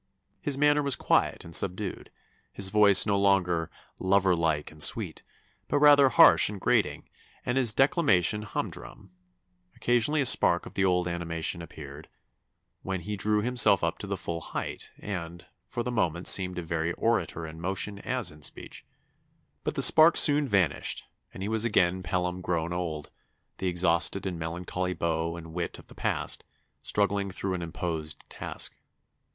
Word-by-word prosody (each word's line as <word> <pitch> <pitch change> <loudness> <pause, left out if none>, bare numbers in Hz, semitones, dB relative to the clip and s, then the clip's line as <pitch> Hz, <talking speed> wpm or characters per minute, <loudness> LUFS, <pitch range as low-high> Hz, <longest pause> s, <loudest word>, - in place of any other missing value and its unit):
His 145 -2 -2
manner 145 +1 +3
was 140 -2 +2
quiet - - 0
and 85 -1 -1
subdued, 95 +1 0 0.4
his 100 -1 -4
voice 100 -2 +5
no 100 -2 +1
longer 90 -4 +1 0.3
'lover 95 -1 +2
like 80 -3 -1
and 75 0 -14
sweet,' - - +3 0.5
but 145 - 0
rather 145 -2 +6
harsh 110 - +6
and 105 -2 -7
grating, - - 0 0.4
and 125 - -1
his 130 -4 +3
declamation 110 - +2
humdrum; 105 -2 -7 0.6
occasionally 120 +6 +1
a 140 - +1
spark 90 -8 +4
of - - -11
the 95 - -1
old 90 -1 +1
animation 85 0 -3
appeared, 75 -2 -11 0.7
when 95 -2 -4
he 105 +4 -5
drew 105 +1 0
himself 125 +1 +3
up - - -2
to - - -6
the - - -3
full 85 0 -5
height, - - -6
and, 85 -3 -7 0.2
for 120 +2 -4
the 125 - -4
moment 85 -7 -1
seemed 90 -1 +4
a 90 - -4
very 85 +1 -2
orator 115 -7 -1
in 80 +1 -10
motion 95 +3 -3
as 125 -2 0
in 75 0 -16
speech; - - -4 0.8
but - - -3
the - - +3
spark 160 +2 +7
soon 145 -1 +5
vanished, 95 - 0 0.3
and 95 - -8
he - - -3
was 110 0 +1
again 95 -5 +1
Pelham 90 +1 -3
grown 85 -1 -2
old, 80 -4 -5 0.5
the 95 - -2
exhausted 90 +1 +1
and 90 -3 -4
melancholy 90 +2 -4
beau 85 0 -2
and 80 -1 -11
wit 85 0 -4
of - - -16
the - - -13
past, - - -3 0.4
struggling 100 -1 -1
through 95 0 -4
an 90 - -4
imposed 80 -2 -5
task.... - - -6
95 Hz, 165 wpm, -27 LUFS, 85-105 Hz, 0.8 s, spark